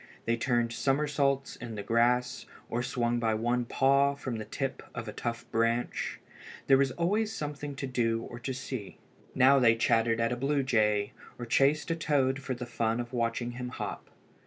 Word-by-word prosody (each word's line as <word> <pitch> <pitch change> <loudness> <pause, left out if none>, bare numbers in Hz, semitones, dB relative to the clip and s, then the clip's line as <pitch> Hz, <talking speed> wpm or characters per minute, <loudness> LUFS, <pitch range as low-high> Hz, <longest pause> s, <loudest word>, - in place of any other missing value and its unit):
They 115 - +2
turned 120 -1 0
summersaults 140 0 0
in 115 -2 -7
the 100 - -5
grass, 125 +3 +1 0.2
or 120 - 0
swung 120 -1 0
by 110 -2 +1
one 120 +2 0
paw 140 +3 +3
from 130 -4 -4
the 110 - -5
tip 135 +5 -3
of 115 -2 -5
a 105 - -5
tough 115 0 -4
branch. 115 +1 0 0.5
There 135 -1 +5
was 140 -1 +3
always 210 - 0
something 150 -6 -5
to 135 - -4
do 115 -3 0
or 120 - -8
to 130 +2 -4
see. 130 -5 -6 0.4
Now 135 +1 +6
they 115 -3 +5
chattered 115 0 +2
at 115 +1 +1
a - - 0
blue 140 +3 0
jay, 105 -5 +2 0.3
or 120 - -5
chased 140 +7 +2
a - - +1
toad 140 -4 +1
for 130 -1 -4
the 125 +1 -6
fun 115 -1 -1
of 120 +1 -5
watching 120 0 -1
him 125 0 -5
hop. - - -6
125 Hz, 185 wpm, -29 LUFS, 115-135 Hz, 0.5 s, Now